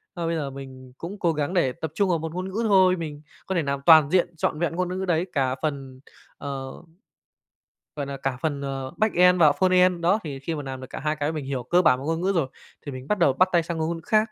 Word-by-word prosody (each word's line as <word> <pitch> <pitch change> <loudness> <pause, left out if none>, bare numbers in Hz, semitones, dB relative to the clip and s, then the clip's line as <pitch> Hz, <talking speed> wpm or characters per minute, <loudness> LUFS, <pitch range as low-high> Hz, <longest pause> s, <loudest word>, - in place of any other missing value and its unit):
Mà 170 -1 -3
bây 165 0 -1
giờ 145 -3 -3
mình 130 -2 -11
cũng 195 +5 -7
cố 170 -2 +1
gắng 150 +4 -2
để 150 -8 +2
tập 160 -2 -6
trung 200 -2 +1
vào 170 - +2
một 160 0 -5
ngôn 185 +1 -3
ngữ 220 +5 -2
thôi, 185 -2 +5
mình 150 -3 -6 0.2
có 190 - -3
thể 170 - +2
làm 140 0 -2
toàn 155 -3 +7
diện, 175 -2 +2
trọn 150 - -1
vẹn 170 -1 -1
ngôn 180 0 -1
ngữ 185 - -4
ngữ 190 0 -3
đấy 175 0 +1
cả 130 -3 +1
phần, 135 -4 -4 0.4
ờ, 135 -2 -5 1.3
gọi 140 -1 -3
là, 140 0 -5
cả 135 -1 -3
phần, 145 -3 -1
ờ, 135 -1 -4
backend 180 -4 +4
và 155 -2 +7
frontend. 185 -1 +3
Đó, 180 +6 +3
thì 140 -3 -5
khi 160 +4 -3
mà 145 - -4
làm 130 -1 -6
được 130 - -8
cả - - -6
hai 155 +1 -1
cái, 150 +2 -1
mình 150 -3 -4
hiểu 135 -2 -3
cơ 175 +8 +2
bản 130 -6 +4
một 135 - -7
ngôn 165 +1 -1
ngữ 195 +2 +1
rồi 140 -5 +1 0.4
thì 140 - -5
mình 130 +1 -9
bắt 210 - +1
đầu 145 -6 +4
bắt 185 +7 +3
tay 170 -1 +4
sang 165 0 -4
ng - - -3
ngôn 165 +1 -1
ngữ - - -9
khác. 215 - +4
160 Hz, 275 wpm, -24 LUFS, 140-180 Hz, 1.3 s, toàn